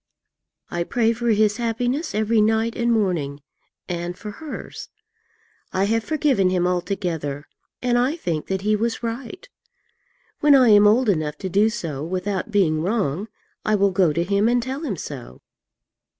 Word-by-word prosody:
I 175 0 -1
pray 230 +5 +1
for 240 +1 -4
his 215 -1 +3
happiness 245 +6 -1
every 220 +1 +2
night 220 +2 +1
and 235 0 +1
morning, 175 -10 0 0.5
and 175 0 -4
for 210 +2 -7
hers. 305 +7 -8 0.8
I 190 - 0
have 225 +2 +1
forgiven 275 -11 +2
him 180 -1 +1
altogether, 175 -6 -2 0.4
and 245 -1 +2
I 260 +6 +1
think 165 - -3
that 190 0 -2
he 215 +2 +2
was 230 +2 -2
right. 245 - -5 0.9
When 295 -1 +6
I 255 -3 +6
am 205 -1 +7
old 235 +4 +4
enough 155 -6 0
to - - -1
do 205 +4 +3
so 165 -11 -4
without 185 +5 -3
being 175 -7 +2
wrong, 190 -1 -1 0.4
I 215 - +2
will 200 -1 +3
go 185 -3 +3
to 170 +3 0
him 200 +4 +2
and 245 0 +2
tell 265 +3 -4
him 220 - -3
so. 130 - -8
205 Hz, 165 wpm, -22 LUFS, 180-235 Hz, 0.9 s, am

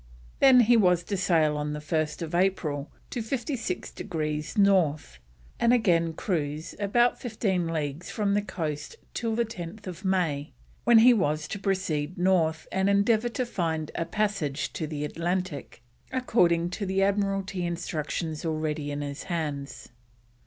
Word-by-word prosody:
Then 260 -2 +8
he 240 +1 +5
was 180 -5 +4
to 200 - -3
sail 165 -5 +2
on 150 0 -2
1st 155 +2 -2
April 170 -6 0 0.2
to 245 - -2
56 230 -4 -3
degrees 155 -1 -4
North, 170 - +2 0.4
and 235 - +4
again 170 -9 +3
cruise 155 -2 -2
about 240 +4 +2
fifteen 200 -7 -1
leagues 155 0 -3
from 205 -2 0
the 205 - +2
coast 165 - -4 0.2
till 230 -2 -1
10th 190 -4 -5
May, 170 -6 0 0.3
when 235 -1 +7
he 240 +3 +8
was 155 -7 0
to 200 - -4
proceed 185 -5 -1
north 170 -3 +2
and 190 +1 +1
endeavour 215 +4 +3
to 255 +1 -2
find 160 -8 -2
a 165 - -2
passage 200 -9 -1
to 160 - -3
the 150 -1 -3
Atlantic, 170 -5 -3 0.3
according 175 -10 +2
to 200 +1 -3
the 190 +1 +2
Admiralty 195 -2 0
instructions 165 -2 -3
already 155 -2 -2
in 145 0 -3
his 140 0 -5
hands. 145 -6 -4
175 Hz, 140 wpm, -27 LUFS, 155-200 Hz, 0.4 s, Then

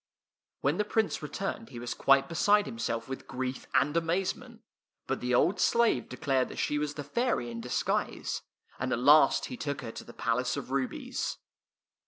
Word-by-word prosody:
When - - +1
the - - +4
Prince 220 +1 0
returned 195 +8 -4
he 120 - -9
was 120 0 -4
quite 135 0 +4
beside 205 +6 +3
himself 115 0 -3
with 135 0 -6
grief 130 0 -4
and 145 +4 +3
amazement; 190 +8 -1 0.4
but 135 - -2
the 125 0 +1
old 180 +10 +3
slave 235 - +3
declared 130 0 0
that - - -9
she 150 - 0
was 150 -1 -2
the 145 - -4
fairy 145 - 0
in 115 0 -5
disguise, 125 +1 -1 0.4
and 130 0 -2
at - - +2
last 140 +3 +6
he 125 - -6
took 145 -2 -3
her 115 - -6
to - - -8
the - - -12
Palace - - 0
of - - -6
Rubies. 135 -1 -2
140 Hz, 180 wpm, -30 LUFS, 125-180 Hz, 0.4 s, last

